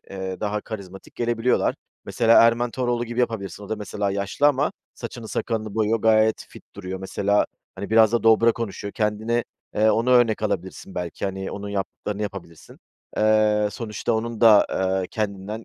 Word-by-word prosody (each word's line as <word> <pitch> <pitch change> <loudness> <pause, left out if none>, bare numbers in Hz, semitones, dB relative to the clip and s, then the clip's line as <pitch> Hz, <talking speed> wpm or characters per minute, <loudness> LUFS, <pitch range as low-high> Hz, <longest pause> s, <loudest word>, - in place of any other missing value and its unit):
ııı, 95 -1 -5
daha 105 0 -1
karizmatik 95 -4 -9
gelebiliyorlar. 120 +1 +1 0.3
Mesela 115 -1 +4
Erman 115 +1 +3
Toroğlu 120 -1 -1
gibi 120 +1 -3
yapabilirsin, 105 -5 -3
o - - -12
da 110 - -2
mesela 105 -1 -3
yaşlı 100 +8 0
ama 145 +1 +2 0.2
saçını 115 -3 -8
sakalını 110 -3 -3
boyuyor, 110 +1 +1
gayet 110 0 +3
fit - - -14
duruyor. 95 -1 -5
Mesela, 100 +2 +1 0.3
hani, 100 - -6
biraz 110 0 +5
da 120 - +1
dobra 115 +1 +5
konuşuyor, 100 -3 -5
kendine, 110 +2 -1 0.3
eee, 110 +1 +4
onu 115 +3 +1
örnek 120 -4 +4
alabilirsin 95 -2 -4
belki, 90 0 -4
hani, 95 0 -3
onun 100 0 -6
yaptıklarını 100 +1 -4
yapabilirsin. 90 -5 -8 0.4
Eee, 105 -1 +3
sonuçta 115 0 -3
onun 115 0 -2
da, 110 -3 +7
eee, 95 0 0
kendinden 105 +1 -4
110 Hz, 160 wpm, -23 LUFS, 100-115 Hz, 0.4 s, da